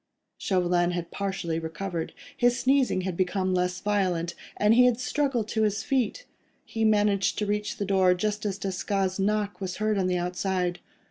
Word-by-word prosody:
Chauvelin 175 -2 +1
had 175 -1 -4
partially 190 -5 -2
recovered; 165 +1 -4 0.2
his 245 -2 +3
sneezing 265 -7 +2
had 185 -1 -3
become 185 +1 0
less 180 0 0
violent, 185 -5 0 0.2
and 210 +1 +4
he 250 +2 +6
had 245 -1 +3
struggled 255 -4 0
to 220 - 0
his 215 0 +1
feet. 270 - -1 0.4
He 225 - -3
managed 205 -2 +2
to 210 - 0
reach 210 0 -2
the 200 - -2
door 190 -2 +3
just 210 +3 -2
as 200 -2 -2
Desgas' 195 0 -2
knock 205 0 0
was 185 -1 -3
heard 215 -1 +1
on 185 - +1
the 180 -1 +1
outside. 180 0 -1
195 Hz, 175 wpm, -27 LUFS, 180-215 Hz, 0.4 s, he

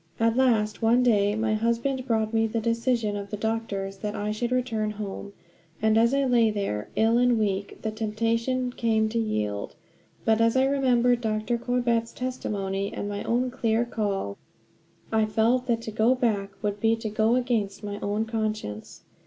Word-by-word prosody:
At 230 0 +2
last, 225 -5 +2
one 235 +3 +4
day 205 -4 +3
my 220 0 0
husband 235 +4 0
brought 220 -2 0
me 225 0 +3
the 225 +1 -2
decision 230 -1 0
of 200 0 -5
the 210 - -4
doctors, 200 -3 -3
that 210 +1 -4
I 210 +1 -2
should 235 +3 -2
return 235 -4 0
home. 205 -1 -6 0.5
And 220 0 +3
as 230 +2 +4
I 275 0 +2
lay 240 -3 +4
there 195 - -3
ill 225 +2 +3
and 245 -1 +3
weak, 200 -2 -1
the 220 - -1
temptation 230 +4 -1
came 220 -2 +1
to 230 +1 -1
yield. 105 - -2 0.5
But, 220 0 +3
as 230 +2 +3
I 260 - +4
remembered 250 -3 +2
Dr. 220 +1 -1
Corbett's 240 -2 0
testimony, 200 -6 -3
and 205 - -4
my 205 0 -4
own 250 +2 0
clear 235 -2 +1
call, 200 - -3 0.7
I 220 -1 +3
felt 235 +4 +2
that 230 -2 0
to 220 - -5
go 225 +4 +3
back 215 -6 0
would 205 0 -1
be 225 +2 +3
to 225 -1 -5
go 220 +2 +2
against 230 -5 -1
my 205 0 -5
own 210 +2 -1
conscience. 215 - -4
225 Hz, 180 wpm, -26 LUFS, 210-240 Hz, 0.7 s, one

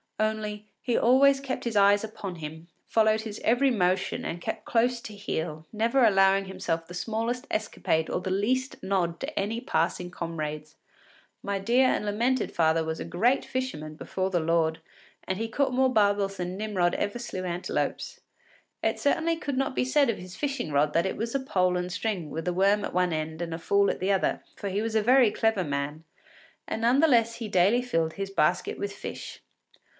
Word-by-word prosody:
Only, 215 -1 -2
he 245 -2 0
always 270 +3 +5
kept 270 -1 -4
his 235 -2 -3
eyes 200 0 +5
upon 205 -4 -6
him, 160 +1 -8 0.2
followed 220 -1 +3
his 220 -1 -7
every 245 +4 +3
motion 185 -5 0
and 170 +1 -4
kept - - -4
close 240 +1 +2
to 215 -2 -9
heel, 160 -6 -4
never 230 +4 +2
allowing 195 -2 +4
himself 175 -3 -3
the 175 - -10
smallest 230 +5 -2
escapade 160 -6 -1
or - - -1
the 185 +1 -4
least 255 +8 0
nod 185 -3 0
to 290 +3 -4
any 220 +4 -2
passing 175 +1 -1
comrades. 155 -3 -5 0.7
My 200 0 -1
dear 245 +6 +3
and 210 - 0
lamented 235 +4 0
father 160 -1 +2
was 160 0 -3
a - - -4
great 235 +10 +1
fisherman 250 -13 -4
before 185 +4 -3
the 175 - +2
Lord, 160 0 +1 0.5
and 190 - -1
he 225 - -1
caught 265 +3 0
more 260 0 +3
barbels 200 -3 +2
than 180 +1 -4
Nimrod 195 -5 0
ever 205 +3 -2
slew 190 -6 -5
antelopes. 175 0 -3 0.6
It - - 0
certainly 325 +3 +1
could 285 -5 -3
not 270 -1 0
be - - +1
said 275 0 +3
of 230 - 0
his 180 0 -10
fishing 275 - -3
rod 145 +1 +2
that 170 +2 +2
it - - -4
was 230 +1 -3
a - - +2
pole 185 -8 +1
and 180 0 -3
string 180 -4 -3
with 165 +2 -5
a 180 - +1
worm 200 +3 +3
at - - -6
one 180 -1 +2
end 160 +1 -3
and 165 -1 -3
a - - -7
fool 200 +3 +2
at - - -6
the 190 +2 +1
other, 190 -1 0
for 200 - -4
he 195 +2 -1
was 225 0 -2
a 220 - +3
very 250 -1 +5
clever 225 -3 +1
man, 145 +1 -3 0.6
and 220 - -3
none 240 +4 +4
the 325 - +6
less 230 -4 +3
he 230 -2 -5
daily 200 +5 +3
filled 165 -9 0
his 195 -1 -5
basket 175 -1 +1
with 200 0 -3
fish. - - -8
200 Hz, 200 wpm, -27 LUFS, 175-230 Hz, 0.7 s, the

